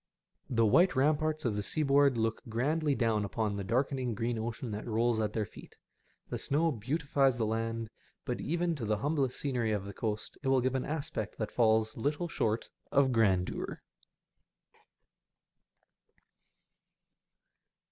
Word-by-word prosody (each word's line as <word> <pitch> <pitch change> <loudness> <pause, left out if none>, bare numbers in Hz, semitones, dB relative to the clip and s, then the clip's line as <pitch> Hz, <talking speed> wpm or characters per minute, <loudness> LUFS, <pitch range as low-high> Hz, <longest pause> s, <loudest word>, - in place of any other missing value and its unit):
The 115 -2 +3
white 170 - +5
ramparts 155 +3 +1
of 110 -4 +1
the 105 - -1
seaboard 140 +1 +3
look 110 0 0
grandly 145 +6 +1
down 115 -4 +1
upon 105 +1 -1
the 100 - -3
dark 125 +9 +1 0.2
green 115 +2 -1
ocean 115 +1 -4
that 105 +2 -5
rolls 115 0 +1
at 105 -1 -1
their 110 -2 0
feet. - - -14 0.5
The - - -3
snow 160 +4 +1
beautifies 135 +1 +1
the 115 - +1
land; 115 +1 -2 0.4
but - - -2
even 170 +1 0
to 120 - -4
the 105 0 +1
humblest 140 0 0
scenery 125 -6 0
of 100 -2 -1
the 100 - -7
coast 105 -1 -4
it 135 - -4
will 135 0 +4
give 130 +1 0
au 130 - 0
aspect 145 -8 -4
that 110 - -3
falls 110 -2 +3
little 145 +8 -1
short 110 -8 -1 0.2
of 140 -2 +4
grandeur. 100 -6 +1
120 Hz, 145 wpm, -31 LUFS, 110-140 Hz, 0.5 s, white